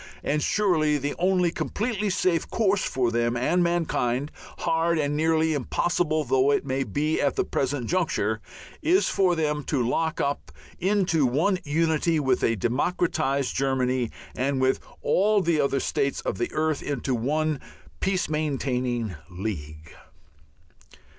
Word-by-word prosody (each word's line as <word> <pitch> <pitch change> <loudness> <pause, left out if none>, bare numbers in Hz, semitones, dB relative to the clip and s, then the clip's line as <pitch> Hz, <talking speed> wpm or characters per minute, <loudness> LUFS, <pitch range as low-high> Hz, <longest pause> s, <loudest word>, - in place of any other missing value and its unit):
And 150 +1 0
surely 160 -8 +2
the 145 +1 -2
only 180 -1 +2
completely 215 +2 -2
safe 180 -3 +1
course 205 -3 +1
for 125 -2 0
them 120 +1 0
and 170 +9 +2
mankind 150 -6 0 0.3
hard 165 +1 +1
and 145 -1 0
nearly 160 +1 +2
impossible 155 +2 0
though 130 +1 +2
it 145 - +1
may 135 0 0
seem 145 +7 -1
at 140 - +1
the - - +1
present 135 -2 -1
juncture 110 - 0 0.4
is 355 +6 +3
for 185 -3 +2
them 150 -2 -1
to 125 -6 0
lock 160 +5 0
up 140 - -2 0.3
into 180 -6 +2
one 165 +10 +1
unity 160 +1 +1
with 130 -3 +1
a 115 - +3
democratized 140 - 0
Germany 130 -2 0 0.3
and 135 +1 0
with 130 0 +2 0.2
all 210 +2 +3
the 170 -5 +2
other 140 0 +1
states 140 +1 -1
of 95 - -3
the 120 - -1
earth 155 -2 0
into 135 -2 -2
one 150 +5 0 0.4
peace 190 -1 0
maintaining 130 -7 -1 0.2
League. 80 -5 -6
150 Hz, 140 wpm, -25 LUFS, 130-170 Hz, 0.4 s, is